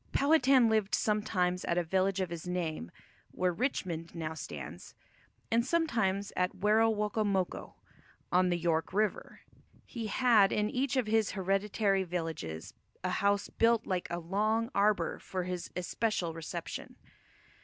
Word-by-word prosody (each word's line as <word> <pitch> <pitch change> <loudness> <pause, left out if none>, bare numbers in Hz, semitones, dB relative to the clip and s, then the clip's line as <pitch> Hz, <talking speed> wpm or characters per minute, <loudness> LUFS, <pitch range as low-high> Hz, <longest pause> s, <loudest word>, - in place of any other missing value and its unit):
Powhatan 275 -4 +5
lived 215 -2 +2
sometimes 185 -4 0
at 170 - 0
a 175 - +2
village 190 +3 +1
of 180 -2 -2
his 170 0 -6
name, 165 - -3 0.4
where 180 -1 0
Richmond 170 - -3
now 160 -1 -3
stands, 160 - -8 0.6
and 230 +1 +3
sometimes 225 - 0
at 180 +1 0
Werowocomoco, 210 -1 +1 0.6
on 180 0 +4
the 175 - +1
York 165 0 0
River. 210 +1 -1 0.4
He 230 -3 -5
had 220 -3 +4
in 210 0 0
each 265 +1 0
of 255 - +2
his 220 -1 +1
hereditary 195 +1 +1
villages 160 - -5 0.3
a 185 - 0
house 200 +2 +1
built 230 0 +3
like 185 -2 -2
a 170 - -2
long 215 +7 0
arbour 205 +1 +2
for 185 -1 -4
his 180 -1 -4
especial 180 -1 -1
reception. 165 -1 -6
195 Hz, 135 wpm, -31 LUFS, 180-220 Hz, 0.6 s, Powhatan